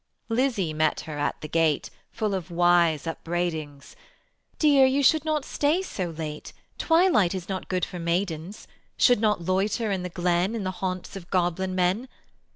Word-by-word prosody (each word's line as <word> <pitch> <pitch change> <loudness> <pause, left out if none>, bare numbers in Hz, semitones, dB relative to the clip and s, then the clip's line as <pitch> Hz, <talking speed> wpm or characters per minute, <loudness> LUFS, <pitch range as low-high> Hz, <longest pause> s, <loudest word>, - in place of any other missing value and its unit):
Lizzie 225 - 0
met 155 0 +1
her 150 -2 -7
at 145 - -1
the 155 - -5
gate 160 -2 +1 0.2
Full 215 -2 -2
of 185 -2 -4
wise 175 -3 +3
upbraidings: 165 -4 -4 0.6
"Dear, 290 -3 +5
you 265 +2 +3
should 310 +3 +4
not 305 -3 0
stay 310 +6 +1
so 185 - -4
late, 155 -2 -7 0.3
Twilight 325 - +3
is 180 -2 -6
not 190 -1 -5
good 185 -1 0
for 180 - -8
maidens; 170 +2 -3 0.3
Should 245 -4 +4
not 210 -6 +1
loiter 200 +4 0
in 190 -2 -1
the 180 - -4
glen 175 +4 0
In 220 - -3
the 185 - -2
haunts 185 0 -3
of 180 -3 -9
goblin 185 +1 0
men. 185 +7 +1
185 Hz, 165 wpm, -26 LUFS, 170-215 Hz, 0.6 s, Dear